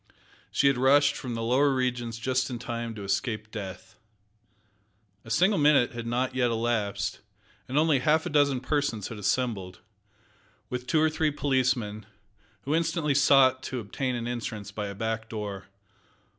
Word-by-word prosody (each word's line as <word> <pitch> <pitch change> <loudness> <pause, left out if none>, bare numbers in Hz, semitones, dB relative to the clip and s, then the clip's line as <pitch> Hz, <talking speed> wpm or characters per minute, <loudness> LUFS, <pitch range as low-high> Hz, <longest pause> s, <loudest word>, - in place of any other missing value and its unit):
She - - +1
had 140 -2 +4
rushed 145 +2 +4
from 125 -3 -5
the 115 - -3
lower 130 +5 +3
regions 125 -3 -2
just 130 +1 0
in 125 - -4
time 115 -1 -5
to 105 - -7
escape 110 +2 -2
death. 100 -4 -8 1.3
A - - -12
single 180 - +3
minute 145 -4 +4
had 120 -1 -6
not 125 +2 -1
yet 125 -2 +1
elapsed, 115 -3 -1 0.5
and 130 - -2
only 155 -3 +4
half 155 +4 +2
a - - -3
dozen 140 -3 +3
persons 135 -7 -1
had 115 - -7
assembled, 100 -3 -1 0.9
with 125 0 -4
two 160 - +2
or 155 0 +3
three 155 0 +1
policemen, 125 -7 0 0.6
who 145 - -1
instantly 165 -2 +1
sought 135 -2 +5
to 130 -1 -4
obtain 125 +4 -3
an 120 0 -4
entrance 110 -4 -5
by 105 0 -4
a 100 - -6
back 110 +1 -3
door. 105 -3 -5
125 Hz, 160 wpm, -27 LUFS, 110-140 Hz, 1.3 s, sought